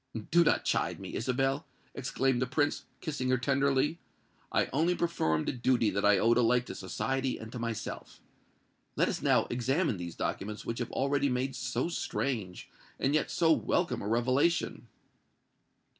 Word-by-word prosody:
"Do 170 Hz, +1 st, +6 dB
not -, -, +2 dB
chide -, -, 0 dB
me, -, -, -8 dB
Isabel," 135 Hz, +4 st, 0 dB, 0.3 s
exclaimed 130 Hz, -1 st, 0 dB
the 125 Hz, -, +1 dB
Prince, 145 Hz, +2 st, 0 dB, 0.2 s
kissing 140 Hz, -6 st, -2 dB
her 130 Hz, -, +3 dB
tenderly. 140 Hz, +4 st, +1 dB, 0.5 s
"I -, -, +2 dB
only 165 Hz, +6 st, +2 dB
performed 80 Hz, -, 0 dB
a -, -, +2 dB
duty 120 Hz, -3 st, +2 dB
that 100 Hz, +1 st, -1 dB
I 105 Hz, -1 st, +5 dB
owed 115 Hz, +5 st, +3 dB
alike 125 Hz, +1 st, +3 dB
to -, -, -6 dB
society 135 Hz, -1 st, -2 dB
and 110 Hz, 0 st, -9 dB
to 125 Hz, -, -6 dB
myself. 115 Hz, -2 st, -5 dB, 0.8 s
Let -, -, +2 dB
us -, -, -3 dB
now -, -, +3 dB
examine 130 Hz, -, 0 dB
these 85 Hz, -1 st, -6 dB
documents 105 Hz, +2 st, -4 dB
which 115 Hz, -, -3 dB
have 120 Hz, -, -3 dB
already 140 Hz, +1 st, +1 dB
made 125 Hz, +1 st, -1 dB
so 125 Hz, +1 st, -1 dB
strange, 115 Hz, -, -3 dB, 0.3 s
and 135 Hz, -, +1 dB
yet 150 Hz, -4 st, +1 dB
so 160 Hz, +6 st, +3 dB
welcome 160 Hz, -5 st, +1 dB
a 100 Hz, -, -4 dB
revelation." 130 Hz, +9 st, +1 dB
130 Hz, 160 wpm, -30 LUFS, 115-140 Hz, 0.8 s, Do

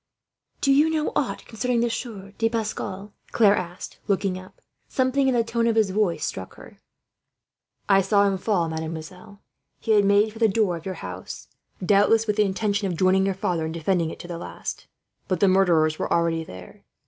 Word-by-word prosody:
"Do 275 Hz, -, +4 dB
you 295 Hz, +3 st, +4 dB
know 310 Hz, -1 st, 0 dB
aught -, -, -1 dB
concerning 235 Hz, +2 st, -1 dB
the 240 Hz, -, +1 dB
Sieur 205 Hz, -5 st, -6 dB
de 225 Hz, 0 st, +2 dB
Pascal?" 210 Hz, -3 st, -4 dB, 0.2 s
Claire 210 Hz, -3 st, +5 dB
asked, 175 Hz, -1 st, -6 dB
looking 195 Hz, -1 st, 0 dB
up. 185 Hz, 0 st, -11 dB, 0.3 s
Something 260 Hz, +1 st, +1 dB
in 260 Hz, -, +2 dB
the 235 Hz, -, +3 dB
tone 230 Hz, 0 st, 0 dB
of 230 Hz, -, +2 dB
his 215 Hz, -4 st, +3 dB
voice 185 Hz, -6 st, 0 dB
struck 95 Hz, 0 st, -6 dB
her. -, -, -14 dB, 1.1 s
"I 195 Hz, -1 st, +5 dB
saw 200 Hz, +1 st, +3 dB
him 195 Hz, -1 st, 0 dB
fall, 185 Hz, -5 st, +1 dB
mademoiselle. 160 Hz, +6 st, -7 dB, 0.4 s
He 225 Hz, -, -2 dB
had 210 Hz, -1 st, +5 dB
made 205 Hz, +2 st, +3 dB
for 225 Hz, -, -11 dB
the 225 Hz, -, +5 dB
door 205 Hz, -3 st, +1 dB
of 165 Hz, +2 st, -8 dB
your 190 Hz, -, -3 dB
house, 90 Hz, 0 st, -8 dB, 0.4 s
doubtless 205 Hz, +3 st, +4 dB
with 210 Hz, -2 st, -1 dB
the 210 Hz, -, +4 dB
intention 200 Hz, +1 st, -1 dB
of 175 Hz, -3 st, -3 dB
joining 190 Hz, +1 st, +3 dB
your 195 Hz, -, -1 dB
father 175 Hz, -3 st, -1 dB
in 160 Hz, -, -3 dB
defending 170 Hz, 0 st, 0 dB
it -, -, -8 dB
to -, -, -10 dB
the 170 Hz, -1 st, -6 dB
last; -, -, -7 dB, 0.4 s
but 185 Hz, -3 st, -1 dB
the 200 Hz, -, +4 dB
murderers 170 Hz, -5 st, +3 dB
were -, -, -3 dB
already 165 Hz, -1 st, +1 dB
there. 90 Hz, -, -12 dB
195 Hz, 195 wpm, -24 LUFS, 175-220 Hz, 1.1 s, Claire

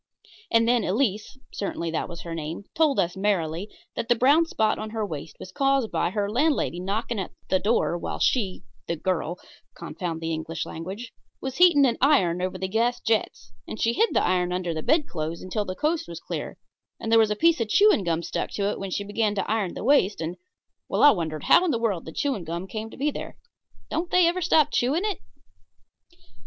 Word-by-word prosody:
And 230 Hz, 0 st, +3 dB
then 240 Hz, -2 st, +3 dB
Elise 215 Hz, +3 st, -1 dB, 0.2 s
certainly 170 Hz, -4 st, -3 dB
that 165 Hz, -, -2 dB
was 170 Hz, -1 st, -8 dB
her 170 Hz, -, -6 dB
name 165 Hz, +3 st, -5 dB
told 310 Hz, -3 st, +2 dB
us, 175 Hz, 0 st, 0 dB
merrily, 190 Hz, -2 st, -1 dB, 0.3 s
that 230 Hz, -, -4 dB
the 240 Hz, -, +5 dB
brown 285 Hz, +8 st, +4 dB
spot 220 Hz, -8 st, +1 dB
on 215 Hz, -, -5 dB
her 220 Hz, -1 st, -2 dB
waist 160 Hz, -4 st, -7 dB
was 185 Hz, -, -9 dB
caused 270 Hz, -1 st, +1 dB
by -, -, 0 dB
her 200 Hz, +2 st, -1 dB
landlady 250 Hz, -, +1 dB
knocking 210 Hz, +4 st, -2 dB
at 190 Hz, -, -5 dB, 0.2 s
the 190 Hz, -, +4 dB
door 210 Hz, -4 st, +1 dB
while -, -, -4 dB
she 200 Hz, -8 st, 0 dB, 0.2 s
(the 170 Hz, -, -1 dB
girl 175 Hz, 0 st, -2 dB, 0.4 s
confound 170 Hz, -4 st, -5 dB
the 165 Hz, 0 st, -3 dB
English 160 Hz, 0 st, -4 dB
language) 195 Hz, +9 st, -7 dB, 0.3 s
was 265 Hz, -1 st, -5 dB
heating 340 Hz, -6 st, +6 dB
an 240 Hz, -3 st, 0 dB
iron 190 Hz, -, +3 dB
over 185 Hz, 0 st, -2 dB
the 190 Hz, -, -3 dB
gas 235 Hz, +5 st, +1 dB
jet, 225 Hz, -1 st, +1 dB, 0.4 s
and -, -, -7 dB
she 230 Hz, -, +2 dB
hid 455 Hz, -, +3 dB
the -, -, +3 dB
iron 180 Hz, 0 st, +1 dB
under 180 Hz, -2 st, -2 dB
the 160 Hz, -, -3 dB
bedclothes 170 Hz, -, -1 dB
until 205 Hz, +3 st, -2 dB
the 185 Hz, -, -4 dB
coast 310 Hz, -, -1 dB
was 170 Hz, -1 st, -7 dB
clear, -, -, -6 dB, 0.4 s
and 225 Hz, -, -4 dB
there 225 Hz, -, +7 dB
was 220 Hz, -1 st, +4 dB
the 210 Hz, -, 0 dB
piece 330 Hz, +2 st, +3 dB
of 220 Hz, -, -1 dB
chewing 410 Hz, -, +5 dB
gum 170 Hz, -1 st, -1 dB
stuck -, -, -3 dB
to 200 Hz, 0 st, -1 dB
it -, -, -5 dB
when 195 Hz, -, -4 dB
she 200 Hz, -, -2 dB
began 210 Hz, +1 st, 0 dB
to 195 Hz, -, -2 dB
iron 210 Hz, -5 st, -1 dB
the -, -, -5 dB
waist, 220 Hz, -, +3 dB
and 165 Hz, +2 st, -3 dB, 0.5 s
well, -, -, +1 dB
I 290 Hz, -, +10 dB
wondered 160 Hz, -, -3 dB
how -, -, +6 dB
in 365 Hz, -, +1 dB
the 260 Hz, -, +1 dB
world 215 Hz, -7 st, -1 dB
the 160 Hz, -, -7 dB
chewing 260 Hz, -, -2 dB
gum 170 Hz, +3 st, -4 dB
came 215 Hz, +3 st, -6 dB
to -, -, -13 dB
be 295 Hz, +3 st, 0 dB
there -, -, -7 dB, 0.5 s
don't 335 Hz, +3 st, -1 dB
they 360 Hz, -1 st, +5 dB
ever 350 Hz, +2 st, +1 dB
stop 310 Hz, -3 st, +3 dB
chewing 295 Hz, +11 st, +1 dB
it? 415 Hz, -3 st, -2 dB
210 Hz, 215 wpm, -25 LUFS, 175-260 Hz, 0.5 s, I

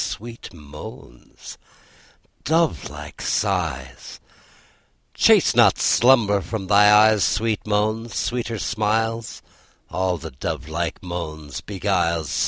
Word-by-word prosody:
Sweet 115 Hz, +2 st, -7 dB
moans, 75 Hz, -5 st, -12 dB, 0.8 s
dovelike 160 Hz, -, -2 dB
sighs, -, -, -3 dB, 0.9 s
Chase -, -, +4 dB
not -, -, +5 dB
slumber 115 Hz, -5 st, +3 dB
from 100 Hz, +1 st, -5 dB
thy 105 Hz, +1 st, +5 dB
eyes! 105 Hz, 0 st, +5 dB
Sweet 110 Hz, -2 st, -1 dB
moans, 110 Hz, +1 st, -1 dB
sweeter 120 Hz, -2 st, -2 dB
smiles, 110 Hz, +2 st, -2 dB, 0.5 s
All 95 Hz, -1 st, -1 dB
the 80 Hz, 0 st, -9 dB
dovelike 80 Hz, +7 st, -4 dB
moans 80 Hz, -5 st, -6 dB
beguiles. 90 Hz, -6 st, -1 dB
105 Hz, 90 wpm, -22 LUFS, 85-110 Hz, 0.9 s, not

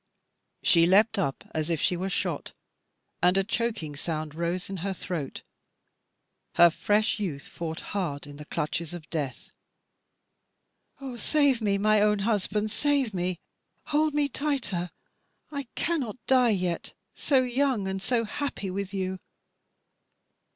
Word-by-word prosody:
She 165 Hz, -1 st, +6 dB
leaped 205 Hz, +3 st, +5 dB
up 140 Hz, -8 st, -1 dB
as 155 Hz, +1 st, -1 dB
if 165 Hz, -3 st, +1 dB
she 180 Hz, -, +2 dB
were 185 Hz, +2 st, -2 dB
shot, -, -, -2 dB, 0.7 s
and 180 Hz, +2 st, +5 dB
a 195 Hz, -, +4 dB
choking 220 Hz, -8 st, -2 dB
sound 155 Hz, 0 st, -3 dB
rose 170 Hz, +3 st, -2 dB
in 195 Hz, -, -5 dB
her 195 Hz, +3 st, -2 dB
throat.. 165 Hz, -6 st, -4 dB, 1.1 s
Her 175 Hz, -1 st, +8 dB
fresh 210 Hz, +6 st, +1 dB
youth 160 Hz, -9 st, -3 dB
fought 160 Hz, -1 st, -5 dB
hard 165 Hz, -9 st, -2 dB
in 145 Hz, 0 st, -10 dB
the 150 Hz, -, -9 dB
clutches 165 Hz, +2 st, -2 dB
of 165 Hz, -2 st, -9 dB
death. 145 Hz, -6 st, -3 dB, 1.5 s
"Oh 265 Hz, -3 st, -6 dB
save 280 Hz, -2 st, +3 dB
me, 200 Hz, -2 st, +2 dB
my 215 Hz, +1 st, +4 dB
own 210 Hz, 0 st, +4 dB
husband, 210 Hz, -1 st, +1 dB
save 280 Hz, -3 st, +1 dB
me. 180 Hz, -1 st, -1 dB, 0.6 s
Hold 305 Hz, 0 st, +3 dB
me 295 Hz, -1 st, +3 dB
tighter; 255 Hz, -12 st, -1 dB, 0.6 s
I 280 Hz, -3 st, -4 dB
cannot 280 Hz, -10 st, -1 dB
die 255 Hz, -2 st, +5 dB
yet. 180 Hz, -5 st, -1 dB, 0.2 s
So 265 Hz, -3 st, +3 dB
young 250 Hz, -4 st, +1 dB
and 190 Hz, 0 st, -2 dB
so 230 Hz, +3 st, +1 dB
happy 215 Hz, -4 st, -3 dB
with 200 Hz, +1 st, -4 dB
you. 190 Hz, -1 st, -2 dB
195 Hz, 140 wpm, -28 LUFS, 170-235 Hz, 1.5 s, Her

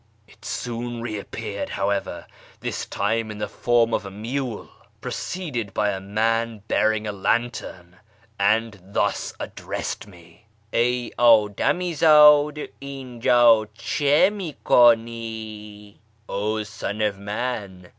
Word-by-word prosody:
It -, -, -21 dB
soon 120 Hz, 0 st, -4 dB
reappeared, 105 Hz, -1 st, -5 dB
however, 100 Hz, 0 st, -2 dB, 0.3 s
this -, -, -4 dB
time 110 Hz, +2 st, -1 dB
in 105 Hz, -, -7 dB
the 105 Hz, -, -3 dB
form 120 Hz, -1 st, +1 dB
of -, -, 0 dB
a 100 Hz, -, -7 dB
mule, 115 Hz, +4 st, -5 dB, 0.3 s
preceded 130 Hz, -, -4 dB
by 105 Hz, -1 st, +1 dB
a 95 Hz, -, -4 dB
man 110 Hz, +2 st, -1 dB
bearing 110 Hz, -1 st, +1 dB
a 105 Hz, -, -2 dB
lantern, 95 Hz, -4 st, -2 dB, 0.4 s
and 105 Hz, +1 st, +1 dB
thus 95 Hz, +2 st, -2 dB
addressed -, -, -5 dB
me: 85 Hz, +2 st, -18 dB
' 105 Hz, +1 st, -38 dB
Ey 125 Hz, 0 st, +1 dB
ddami 120 Hz, -, +3 dB
zdd! 150 Hz, -1 st, +5 dB
Iwjd 120 Hz, -4 st, +3 dB
cM 145 Hz, -, +2 dB
ini 160 Hz, -6 st, -5 dB
ku7ii 110 Hz, -3 st, +1 dB
V -, -, -31 dB, 0.3 s
('0 105 Hz, +2 st, -2 dB
son 105 Hz, 0 st, -5 dB
of 105 Hz, -2 st, 0 dB
man 100 Hz, -3 st, -4 dB
110 Hz, 120 wpm, -23 LUFS, 105-120 Hz, 0.4 s, zdd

